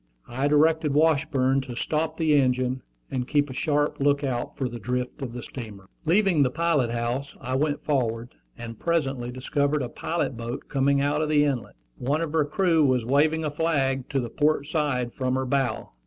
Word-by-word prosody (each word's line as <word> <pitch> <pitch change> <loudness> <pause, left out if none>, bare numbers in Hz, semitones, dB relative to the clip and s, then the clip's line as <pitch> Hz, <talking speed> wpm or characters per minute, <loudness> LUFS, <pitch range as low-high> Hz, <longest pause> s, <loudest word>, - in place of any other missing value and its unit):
I 130 +4 -1
directed 150 0 +3
Washburn 140 -4 +2
to 130 -2 -7
stop 155 +6 -1
the 160 -2 +2
engine, 130 -2 +2 0.3
and 125 -1 -2
keep 145 -2 +1
a - - -6
sharp 145 +2 0
lookout 140 -3 0
for 130 - -1
the 120 -1 -7
drift 125 +4 -3
of 130 -3 -4
the 120 -1 -6
steamer. 105 -7 -9 0.2
Leaving 180 -1 +3
the 130 - +4
pilot 150 -4 +1
house, 120 +4 -3
I 130 0 -4
went 145 +2 0
forward, 120 -4 -1 0.2
and 115 -1 -8
presently 135 -7 -1
discovered 140 +3 0
a 120 - -4
pilot 165 +2 -2
boat 120 +2 -6
coming 140 0 +2
out 145 +2 +1
of 155 - -1
the 150 -1 +4
inlet. 135 -6 -2 0.2
One 140 +6 0
of 165 -2 -3
her 155 -2 +3
crew 165 +1 +2
was 130 -4 +2
waving 155 +5 +2
a 150 - -1
flag 140 -4 0
to 135 - 0
the 120 -3 -4
port 150 -1 +1
side 145 -6 -1
from 130 -1 -1
her 130 0 -1
bow. 135 -1 -1
140 Hz, 190 wpm, -25 LUFS, 125-150 Hz, 0.3 s, the